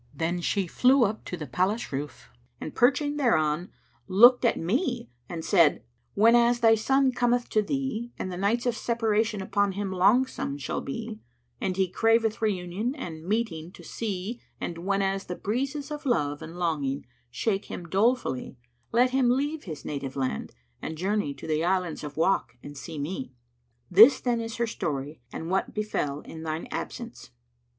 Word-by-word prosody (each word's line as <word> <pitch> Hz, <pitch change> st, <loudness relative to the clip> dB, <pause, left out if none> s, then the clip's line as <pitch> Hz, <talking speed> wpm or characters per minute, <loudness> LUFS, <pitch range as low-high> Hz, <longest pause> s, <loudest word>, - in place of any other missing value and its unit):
Then 170 Hz, +4 st, -1 dB
she 195 Hz, +2 st, 0 dB
flew 255 Hz, +9 st, +4 dB
up 215 Hz, 0 st, -1 dB
to 180 Hz, -, -5 dB
the 155 Hz, -, -5 dB
palace 185 Hz, -, -1 dB
roof 140 Hz, -, -6 dB, 0.3 s
and -, -, -6 dB
perching 290 Hz, +4 st, +2 dB
thereon, 170 Hz, -, +1 dB, 0.4 s
looked 240 Hz, +7 st, +7 dB
at 235 Hz, -, +3 dB
me 240 Hz, -, -1 dB, 0.2 s
and 165 Hz, -2 st, -5 dB
said: 170 Hz, -7 st, +4 dB, 0.3 s
'Whenas 235 Hz, +3 st, +5 dB
thy 225 Hz, -1 st, +7 dB
son 265 Hz, +4 st, +3 dB
cometh 245 Hz, 0 st, +1 dB
to 215 Hz, -, +3 dB
thee 240 Hz, 0 st, -3 dB
and 185 Hz, -, -4 dB
the -, -, -4 dB
nights 215 Hz, +6 st, +1 dB
of 245 Hz, -2 st, +1 dB
separation 220 Hz, -3 st, 0 dB
upon 200 Hz, 0 st, +1 dB
him 200 Hz, 0 st, -3 dB
longsome 195 Hz, -, +2 dB
shall -, -, -3 dB
be 220 Hz, +9 st, -5 dB, 0.4 s
and 185 Hz, -1 st, -1 dB
he 190 Hz, -1 st, +3 dB
craveth 225 Hz, +3 st, +2 dB
reunion 205 Hz, +4 st, -1 dB
and 165 Hz, -, -7 dB
meeting 185 Hz, -6 st, -1 dB
to 175 Hz, -, -13 dB
see 210 Hz, +4 st, -4 dB, 0.2 s
and 170 Hz, -1 st, -4 dB
whenas 195 Hz, +1 st, 0 dB
the 180 Hz, -, -5 dB
breezes 275 Hz, -, -3 dB
of 295 Hz, -1 st, -5 dB
love 145 Hz, -, 0 dB
and 165 Hz, +2 st, -8 dB
longing 145 Hz, -6 st, -1 dB, 0.2 s
shake 195 Hz, -, -1 dB
him 175 Hz, -, -7 dB
dolefully 195 Hz, -, 0 dB, 0.3 s
let 250 Hz, +2 st, +4 dB
him 260 Hz, -2 st, +3 dB
leave 290 Hz, +5 st, 0 dB
his 155 Hz, -5 st, -7 dB
native 140 Hz, -2 st, -4 dB
land 130 Hz, -, -3 dB, 0.3 s
and 160 Hz, -, -5 dB
journey 195 Hz, -3 st, 0 dB
to 140 Hz, -, -10 dB
the 155 Hz, 0 st, 0 dB
Islands 180 Hz, -3 st, 0 dB
of 145 Hz, 0 st, -7 dB
Wak 165 Hz, -6 st, +1 dB
and 145 Hz, -, -9 dB
seek 155 Hz, +2 st, -7 dB
me.' 140 Hz, -4 st, -5 dB, 0.6 s
This, 220 Hz, +9 st, +8 dB
then, 240 Hz, -2 st, 0 dB
is 225 Hz, 0 st, -5 dB
her 235 Hz, -, 0 dB
story 150 Hz, -, -4 dB
and 165 Hz, +2 st, -5 dB
what 190 Hz, -, 0 dB
befel 150 Hz, -9 st, -2 dB
in 160 Hz, -, -10 dB
thine 160 Hz, 0 st, -4 dB
absence." -, -, -6 dB
200 Hz, 170 wpm, -27 LUFS, 160-235 Hz, 0.6 s, This